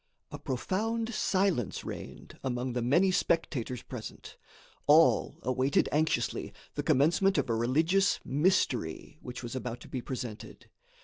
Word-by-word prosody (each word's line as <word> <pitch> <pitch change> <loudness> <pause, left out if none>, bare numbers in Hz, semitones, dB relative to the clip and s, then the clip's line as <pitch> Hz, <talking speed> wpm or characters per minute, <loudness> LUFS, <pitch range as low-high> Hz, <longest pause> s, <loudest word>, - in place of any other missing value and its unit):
A - - -7
profound 225 - -2
silence 185 - 0
reigned - - -8
among 125 -1 -2
the 125 - -1
many 170 +11 +3
spectators 130 -9 0
present. 120 -4 -8 0.5
All 155 +3 +5
awaited 130 +2 +2
anxiously 155 +2 0 0.2
the - - -2
commencement 170 +8 +3
of 135 -4 +1
a - - +2
religious 160 - +2
"mystery," 140 - 0
which 125 0 -7
was 120 +1 -5
about 125 -2 -4
to - - -11
be 130 - -4
presented. 120 -4 -7
135 Hz, 130 wpm, -30 LUFS, 125-180 Hz, 0.5 s, All